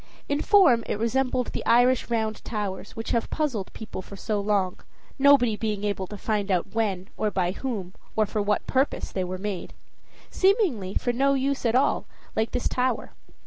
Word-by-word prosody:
In 285 +1 0
form 365 - +5
it - - -1
resembled 250 +2 0
the - - -4
Irish 245 +2 +4
round 220 -2 -1
towers, 205 -3 -4
which 225 - -4
have 230 - 0
puzzled 255 -11 -2
people 215 -4 -7
for 200 - -11
so 210 +1 -2
long, 200 -3 0 0.4
nobody 270 -5 +5
being 210 -2 -2
able 200 -2 -1
to 205 - -8
find 210 -1 -1
out 185 0 0
when, 200 -4 -1
or 215 - +1
by 180 -3 0
whom, 200 -5 -4 0.2
or 215 - +3
for 210 +1 -2
what 205 +1 0
purpose 265 +2 0
they 190 - -1
were 185 +1 -4
made; 195 -1 -5 0.6
seemingly 370 - +2
for 245 - 0
no 275 +3 +3
use 270 -1 0
at 230 - +1
all, 270 +3 +2 0.3
like 220 +1 +1
this 250 - -1
tower. 255 0 -1
220 Hz, 185 wpm, -26 LUFS, 200-255 Hz, 0.6 s, form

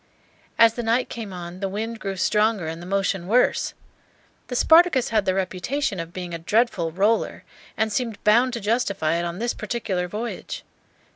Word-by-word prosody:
As 230 -1 +6
the 240 - -4
night 235 +2 +1
came 220 -4 -6
on, 175 0 -7
the 195 -1 -2
wind 225 +3 -4
grew 195 -2 -4
stronger 210 0 +1
and 165 +1 -5
the 175 - -9
motion 195 -2 -1
worse. 245 +5 +2 0.7
The 250 - -5
"Spartacus" 320 -2 +5
had 215 -3 +1
the 185 - +1
reputation 190 +5 -2
of 165 0 -5
being 175 -1 -6
a 170 - -4
dreadful 190 -2 +1
"roller," 205 +6 +1 0.3
and 220 -1 0
seemed 230 -2 -2
bound 235 +4 +4
to 235 - -2
justify 200 -7 0
it 170 - -1
on 170 0 -4
this 235 +3 -1
particular 190 -7 -3
voyage. 215 +6 -5
210 Hz, 180 wpm, -24 LUFS, 180-230 Hz, 0.7 s, As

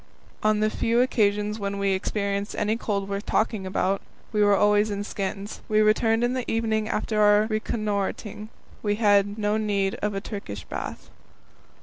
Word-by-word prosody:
On 215 0 +2
the 215 0 +2
few 230 +2 +1
occasions 210 -4 +1
when 200 -1 -3
we 200 0 +1
experienced 200 +1 -2
any 210 +1 +1
cold 200 -4 -2
worth 200 0 -3
talking 215 -3 0
about, 190 +1 0 0.3
we 210 -1 +3
were 205 -1 +5
always 210 +1 +3
in 205 0 -3
skins. 200 0 -5
When 215 - +1
we - - +5
returned 225 +2 +3
in 245 +1 +1
the 255 -1 -2
evening 220 -1 0
after 215 0 0
our 210 0 +5
reconnoitring, 215 -1 -3 0.3
we 205 -1 0
had 205 -1 +3
no 210 0 +1
need 200 -3 0
of 210 -1 -1
a - - 0
Turkish 200 - -6
bath. - - -7
210 Hz, 175 wpm, -25 LUFS, 200-215 Hz, 0.3 s, were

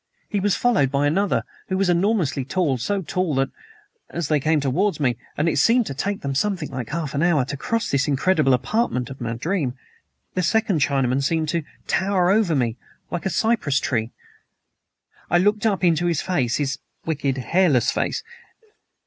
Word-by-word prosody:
He 205 - -1
was 200 -1 +2
followed 230 - +2
by 140 +1 +1
another, 190 +7 +1 0.3
who 190 - 0
was 195 0 +2
enormously 175 -6 +1
tall 140 -2 0
so 195 - -1
tall 180 -2 -1
that, 135 0 +1 0.6
as 170 -4 -3
they 150 -1 +3
came 155 +2 +2
towards 165 +9 0
me 125 -5 +1 0.2
(and 150 - +1
it 160 - +2
seemed 230 - +4
to 140 - -4
take 195 +9 -3
them 140 -1 -2
something 180 +1 -1
like 125 -3 -5
half 155 -2 -3
an 140 - 0
hour 160 -6 +3
to 140 - -4
cross 230 +10 -2
this 140 -1 +1
incredible 145 -1 +3
apartment 125 - -1
in 135 - -8
my 115 -2 -3
dream), 135 +1 -2 0.6
the 185 - 0
second 190 -1 +1
Chinaman 135 -2 +1
seemed 155 +2 0
to 170 +1 0 0.2
tower 190 -1 +2
over 200 -6 +3
me 120 -3 0 0.3
like 175 +1 -2
a - - 0
cypress 210 - +1
tree. 115 -3 -1 1.2
"I 175 - +4
looked 205 +4 +2
up 200 -3 0
to 175 -1 +2
his 170 -4 +1
face 130 -10 0
his 140 -2 -2 0.3
wicked, 140 -4 -1
hairless 135 -1 +2
face. - - -1
160 Hz, 185 wpm, -23 LUFS, 135-190 Hz, 1.2 s, seemed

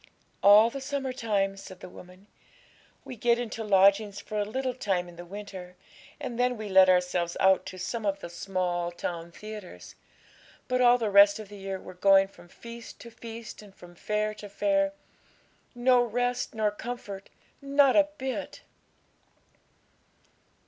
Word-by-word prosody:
'All 210 +3 +7
the 275 - -6
summer 270 -1 -3
time,' 205 -6 0
said 190 -1 -11
the - - -9
woman. 180 +2 -14 0.8
'We 255 - -8
get 235 +2 +2
into 230 -2 -4
lodgings 200 0 +3
for 210 0 -5
a - - +2
little 255 +4 -2
time 195 -8 -1
in 175 - -13
the 175 +1 -10
winter; 190 -2 -9 0.4
and 240 -1 -5
then 250 0 +1
we 215 -1 -6
let 190 -1 +6
ourselves 180 -1 +1
out 190 0 +3
to 185 - -8
some 215 +5 -4
of 200 -1 -1
the - - -7
small 175 0 -2
town 170 -1 -5
theatres; 205 - -10 0.7
but 255 0 +1
all 245 0 +6
the 220 -4 -2
rest 200 0 +7
of 215 -2 -9
the 205 - -10
year 195 0 -5
we're 185 - -11
going 195 +1 +5
from 185 -2 -18
feast 235 +5 -11
to 235 - -11
feast 230 -1 -9
and 200 -2 -16
from 175 0 -14
fair 210 +4 -2
to 210 -1 -10
fair 295 +6 +1 0.8
no 245 0 +4
rest 245 +1 -2
nor 215 -1 +1
comfort, 210 -3 -7 0.3
not 280 -1 +4
a 300 -1 +5
bit!' 260 -1 -5
210 Hz, 165 wpm, -28 LUFS, 190-240 Hz, 0.8 s, All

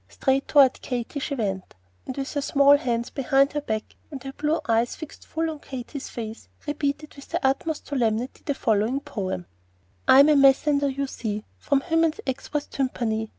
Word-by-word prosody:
Straight 270 0 0
toward 275 -3 +5
Katy 250 +2 -3
she 280 +1 -3
went, 195 -6 -3 0.3
and 260 - -5
with 275 0 -3
her 290 - 0
small 280 0 +5
hands 235 -4 -1
behind 275 +1 +2
her 295 - -1
back 215 -6 -4
and 275 -5 -8
her 270 0 -6
blue 305 +3 0
eyes 230 +1 +2
fixed 315 -3 -10
full 325 +1 -1
on 305 - -8
Katy's 265 +1 -7
face, 225 -1 -7 0.2
repeated 295 0 -2
with 280 - -13
the - - -1
utmost 290 +4 0
solemnity 240 -2 -1
the 285 - -1
following 225 +3 +1
"poem:" 195 - -4 0.6
"I'm 280 +3 +8
a 305 - +6
messender, 280 +1 +4
you 275 +1 -2
see, 215 -5 -4 0.2
Fwom 275 -1 +2
Hymen's 325 -1 +1
Expwess 285 +2 -3
Tumpany. 225 -5 -2
275 Hz, 175 wpm, -25 LUFS, 235-285 Hz, 0.6 s, I'm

